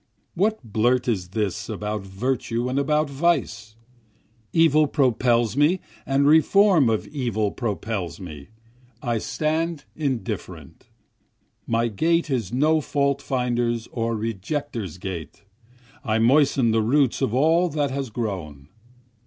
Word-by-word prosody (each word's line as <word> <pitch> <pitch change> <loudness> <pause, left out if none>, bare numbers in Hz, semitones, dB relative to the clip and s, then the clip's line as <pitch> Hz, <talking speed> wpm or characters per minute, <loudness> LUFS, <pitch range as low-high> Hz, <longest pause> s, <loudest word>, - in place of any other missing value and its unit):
What 215 +2 0
blurt 120 +3 +1
is 95 -7 -1
this 105 0 -3
about 105 0 -3
virtue 115 +4 -2
and 130 +2 0
about 150 +2 +1
vice? 135 -8 -1 0.8
Evil 155 -2 +4
propels 120 -4 +2
me 150 +6 +3 0.3
and 140 +1 +2
reform 160 - +5
of 110 -1 0
evil 115 -7 -1
propels 105 -6 -4
me, 75 -7 -9 0.6
I 120 -3 0
stand 155 +3 -2
indifferent, 110 - -5 0.8
My 115 +1 +1
gait 165 - 0
is 115 -7 -1
no 155 +5 +2
fault 140 -1 0
finder's 120 -3 -1
or 115 -1 -1
rejecter's 110 - -4
gait, 90 -2 -7 0.6
I 110 -4 0
moisten 130 0 +3
the 110 0 +2
roots 130 +3 +2
of - - +1
all 165 +6 +3
that 145 -3 -1
has 135 -2 -3
grown. 90 - -5
120 Hz, 120 wpm, -23 LUFS, 110-145 Hz, 0.8 s, reform